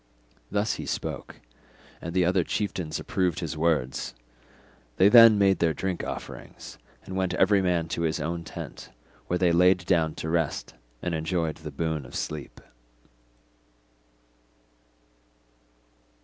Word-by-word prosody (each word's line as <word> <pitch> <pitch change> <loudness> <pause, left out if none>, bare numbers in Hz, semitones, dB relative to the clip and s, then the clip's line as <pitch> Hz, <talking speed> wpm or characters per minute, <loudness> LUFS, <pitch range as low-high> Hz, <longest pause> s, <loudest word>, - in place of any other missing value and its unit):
Thus 105 +2 0
he - - -6
spoke, - - -5 0.6
and 85 +1 -6
the 90 -2 +4
other 90 0 +2
chieftains 90 -5 -3
approved 90 -3 -1
his 80 -2 -4
words. 75 -7 0 0.8
They 95 - +6
then 115 -2 +9
made 95 -1 +3
their 80 -2 +2
drink 95 +3 -3
offerings - - -8 0.3
and 95 - -7
went 95 -1 0
every 100 +2 +4
man 90 -3 +1
to 85 - -2
his 80 -1 0
own 85 +3 -3
tent, - - -8 0.4
where 90 - 0
they 90 -1 +3
laid 90 +1 +4
down 80 -3 +2
to - - -5
rest 80 -2 -1 0.3
and 90 - -1
enjoyed 80 -1 -1
the 80 -1 -8
boon 80 +1 -2
of - - -12
sleep. 75 -2 -5
85 Hz, 135 wpm, -27 LUFS, 80-95 Hz, 0.8 s, then